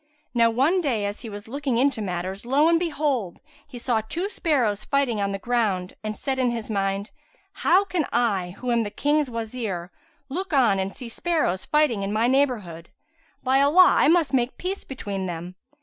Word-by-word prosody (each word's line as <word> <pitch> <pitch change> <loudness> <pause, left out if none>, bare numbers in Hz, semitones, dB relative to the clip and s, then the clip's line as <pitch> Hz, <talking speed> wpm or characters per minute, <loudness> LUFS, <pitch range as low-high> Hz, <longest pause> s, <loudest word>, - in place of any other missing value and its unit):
Now 230 -1 +4
one 280 +11 +2
day 240 -10 0
as 205 +1 -4
he 230 - -7
was 205 +1 -9
looking 270 0 -2
into 260 -2 +2
matters, 185 0 -4
lo 275 +6 +3
and 335 0 +4
behold! 290 - -1 0.3
he 270 -4 -10
saw 235 -2 0
two 335 - -3
sparrows 250 - 0
fighting 265 -6 0
on 200 0 0
the 195 - -2
ground 200 -5 -1
and 215 0 -4
said 265 -1 -2
in 250 -1 +2
his 230 -2 -4
mind, 195 0 -1 0.5
"How 380 +4 +4
can 350 -7 -1
I, 195 -7 0
who 250 -1 -3
am 235 -1 +3
the 210 - -2
King's 290 +4 +1
Wazir, 220 -6 -4 0.4
look 360 +6 -4
on 235 -8 +4
and 190 +1 -3
see 245 - -6
sparrows 230 - -1
fighting 300 -9 +2
in 195 +1 -2
my 220 +2 +1
neighbourhood? 235 -12 0 0.5
By 265 +1 +3
Allah, 325 +6 +6
I - - +5
must 325 -3 +3
make 250 -1 +1
peace 380 +2 -4
between 200 -8 -5
them!" 175 +1 -6
240 Hz, 190 wpm, -24 LUFS, 200-285 Hz, 0.5 s, Allah